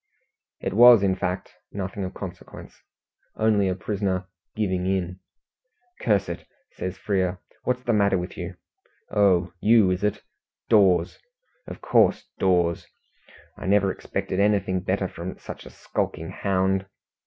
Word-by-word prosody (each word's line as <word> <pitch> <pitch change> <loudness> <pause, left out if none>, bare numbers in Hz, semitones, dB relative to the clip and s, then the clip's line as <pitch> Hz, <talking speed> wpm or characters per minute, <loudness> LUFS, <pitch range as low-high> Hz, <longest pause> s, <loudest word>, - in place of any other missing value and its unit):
It - - -2
was, 120 -1 +8
in 95 -1 +2
fact, 90 0 -3 0.2
nothing 100 0 -4
of 95 - -5
consequence 95 -3 -10 0.5
only 105 -3 +2
a 95 - 0
prisoner 95 -1 -2 0.3
"giving 95 -4 -1
in". 90 -1 -1 0.8
"Curse 100 -4 +1
it!" 85 - -6 0.2
says 90 0 -5
Frere, 95 -2 -1 0.3
"What's 125 0 -1
the 120 - +1
matter 100 -2 +3
with 90 0 -5
you? - - -6 0.6
Oh, 95 -4 +3
you, 110 -3 +5
is 90 +1 -2
it? 105 - -1 0.5
Dawes! 95 -6 +4 0.5
Of - - -8
course, - - +3
Dawes. 90 -3 +1 0.7
I - - -5
never 100 -1 +3
expected 95 - -4
anything 100 -2 +2
better 95 +1 -1
from 90 +1 -7
such - - -9
a - - -10
skulking 80 +2 -4
hound. 95 0 0
95 Hz, 135 wpm, -25 LUFS, 90-100 Hz, 0.8 s, was